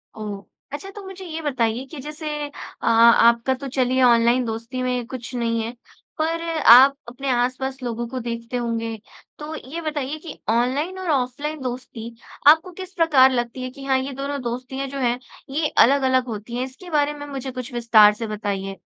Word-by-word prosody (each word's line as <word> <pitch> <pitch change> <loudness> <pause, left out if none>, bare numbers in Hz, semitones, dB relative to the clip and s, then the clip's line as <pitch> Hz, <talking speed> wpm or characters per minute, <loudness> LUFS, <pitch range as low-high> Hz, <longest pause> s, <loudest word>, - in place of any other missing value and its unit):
ओह! 205 -2 -6 0.3
अच्छा 385 +7 -6
तो 410 0 -10
मुझे 380 0 -9
ये 325 -2 -5
बताइए 255 -4 -1
कि 305 - -8
जैसे 300 +2 -7 0.2
अ, 290 - -10
आपका 235 +2 +5
तो 270 +1 -6
चलिए 260 0 +1
ऑनलाइन 240 +1 +4
दोस्ती 230 +3 -4
में 250 -1 -1
कुछ 250 -1 -7
नहीं 230 -1 0
है 225 - -4 0.5
पर 330 +1 -1 0.3
आप 270 +3 +8
अपने 270 +3 -5
आस-पास 255 +2 -1
लोगों 235 -1 -3
को 260 +1 -4
देखते 235 0 -4
होंगे। 230 -1 -2 0.4
तो 300 +1 -6 0.2
ये 335 +2 -4
बताइए 300 -2 -3
कि 325 - -9
ऑनलाइन 265 +10 0
और 370 - -4
ऑफलाइन 285 +3 -2
दोस्ती 245 -2 -6 0.4
आपको 320 +5 +6
किस 375 +1 -9
प्रकार 295 -7 +5
लगती 240 +1 -2
है 255 - -4
कि 275 +2 -12
हाँ 265 -1 +2
ये 270 +2 -4
दोनों 280 +1 -4
दोस्तियाँ 255 +3 -4
जो 275 +1 -6
हैं 245 -1 +1 0.3
ये 300 +2 0
अलग-अलग 260 -1 +4
होती 225 +1 -6
हैं, 250 - -1
इसके 270 +8 -12
बारे 295 -2 +1
में 290 0 -8
मुझे 270 -2 -5
कुछ 255 0 -7
विस्तार 225 -3 +6
से 225 +2 -5
बताइए? 200 -2 -4
255 Hz, 185 wpm, -22 LUFS, 235-285 Hz, 0.5 s, आप